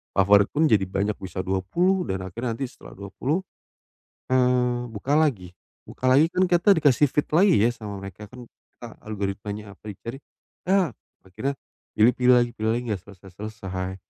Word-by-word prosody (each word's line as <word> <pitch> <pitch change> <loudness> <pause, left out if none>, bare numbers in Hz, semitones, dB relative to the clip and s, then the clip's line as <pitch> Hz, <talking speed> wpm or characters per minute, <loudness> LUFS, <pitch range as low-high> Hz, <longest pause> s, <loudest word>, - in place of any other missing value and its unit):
favorit 100 +1 +5
pun, 155 +2 +2
jadi 105 -7 +3
banyak, 100 +2 -1
bisa 95 -1 -7
20, 170 - +1
dan 95 0 -3
akhirnya 115 +5 -4
nanti 135 +1 -3
setelah - - -15
20, 115 - -2 0.9
eee, 125 -1 +2
buka 130 +7 -1
lagi. 125 - +1 0.4
Buka 130 - -4
lagi, 145 +5 +5
kan, 185 - +2
kita 175 +3 +4
dikasih 145 -3 +4
feed 150 - 0
lagi, 190 +1 +5
ya, 115 +3 +3
sama 105 -4 -7
mereka, 100 +2 -9
kan, 125 -2 -11 0.4
a 120 - -5 0.2
algoritmanya 100 0 -5
apa - - -42
dicari, 115 +7 -8 0.5
ya, 190 -3 +3 0.4
akhirnya 135 +9 -3 0.4
pilih-pilih 125 +3 +4
lagi, 120 0 +1
pilih 110 +1 0
lagi, 120 - -3
enggak 95 - -3
selesai-selesai. 95 -1 -7
115 Hz, 160 wpm, -24 LUFS, 100-135 Hz, 0.9 s, favorit